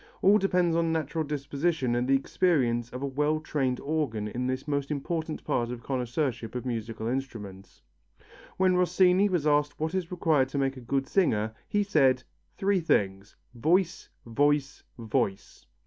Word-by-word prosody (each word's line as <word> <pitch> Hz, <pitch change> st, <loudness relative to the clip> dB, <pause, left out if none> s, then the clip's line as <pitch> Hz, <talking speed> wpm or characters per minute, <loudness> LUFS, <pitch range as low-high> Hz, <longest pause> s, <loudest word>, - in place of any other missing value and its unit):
All 205 Hz, +2 st, +6 dB
depends 180 Hz, -4 st, +2 dB
upon 165 Hz, -1 st, +1 dB
natural 160 Hz, 0 st, -1 dB
disposition 145 Hz, -1 st, -1 dB
and 120 Hz, +1 st, 0 dB
the 135 Hz, -, +4 dB
experience 130 Hz, -6 st, +1 dB
of 125 Hz, +2 st, -6 dB
a -, -, +1 dB
well 150 Hz, +3 st, 0 dB
trained 135 Hz, -5 st, -1 dB
organ 140 Hz, -9 st, -2 dB
in 125 Hz, +4 st, -3 dB
this 130 Hz, +2 st, -3 dB
most 140 Hz, -1 st, -1 dB
important 155 Hz, +2 st, -3 dB
part 120 Hz, -5 st, -1 dB
of 120 Hz, -1 st, -6 dB
connoisseurship 125 Hz, -2 st, -2 dB
of 125 Hz, -, -4 dB
musical 115 Hz, -2 st, -4 dB
instruments. 105 Hz, -, -5 dB, 0.7 s
When 185 Hz, -1 st, +3 dB
Rossini 180 Hz, +2 st, +4 dB
was 175 Hz, -5 st, 0 dB
asked 145 Hz, -1 st, +2 dB
what 160 Hz, +2 st, -2 dB
is 185 Hz, -3 st, -2 dB
required 160 Hz, -7 st, +2 dB
to 140 Hz, -, -4 dB
make 135 Hz, -1 st, 0 dB
a 130 Hz, -, -9 dB
good 135 Hz, +3 st, -1 dB
singer, 110 Hz, -, +1 dB
he 205 Hz, 0 st, +1 dB
said: 135 Hz, -9 st, +3 dB, 0.3 s
"Three 195 Hz, 0 st, +2 dB
things, 100 Hz, -, 0 dB, 0.2 s
voice, 170 Hz, +8 st, +1 dB, 0.2 s
voice, 145 Hz, +4 st, +1 dB, 0.2 s
voice." 105 Hz, -4 st, -3 dB
140 Hz, 160 wpm, -28 LUFS, 125-165 Hz, 0.7 s, All